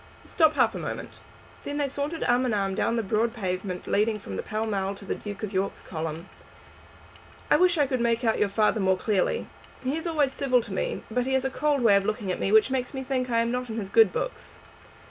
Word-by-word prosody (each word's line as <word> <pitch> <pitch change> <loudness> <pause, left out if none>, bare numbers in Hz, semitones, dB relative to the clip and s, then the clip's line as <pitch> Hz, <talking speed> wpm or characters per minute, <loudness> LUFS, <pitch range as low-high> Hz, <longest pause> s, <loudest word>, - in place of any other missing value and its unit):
"Stop 315 -2 +3
half - - +3
a - - -5
moment." - - -6 0.4
Then 285 - -4
they 290 -1 +1
sauntered 285 +4 -3
arm 245 +1 +3
in 225 - 0
arm 195 -1 0
down 230 - 0
the 230 - 0
broad 225 +3 0
pavement 185 -3 -3
leading 215 +1 +1
from 205 - -8
Pall 215 +1 -2
Mall 200 -2 -1
to 200 - -12
the - - -1
Duke 205 0 -7
of 210 -1 -4
York's 190 +1 -2
column. 160 +1 -5 1.2
"I - - +7
wish 360 -1 +3
I 290 - +4
could 255 -2 -1
make 235 0 +1
out 225 -2 +2
your 205 - +2
father 215 +2 +2
more 190 -1 +2
clearly. 215 - 0 0.4
He 260 +3 -1
is 325 +2 -3
always 295 -5 +1
civil 255 -4 +2
to 205 - -8
me, - - -2
but 250 +2 0
he 265 - 0
has 265 0 +1
a 265 - 0
cold 290 0 +1
way 220 -4 +5
of 200 - -1
looking 210 -3 -2
at - - -3
me 195 - 0
which 220 +4 +5
makes 260 +1 -2
me 265 - -3
think 255 -1 -1
I 230 -1 +2
am 230 0 0
not 250 0 -3
in 220 - -4
his 200 -3 -4
good 225 -4 +6
books." - - -4
230 Hz, 240 wpm, -26 LUFS, 200-265 Hz, 1.2 s, I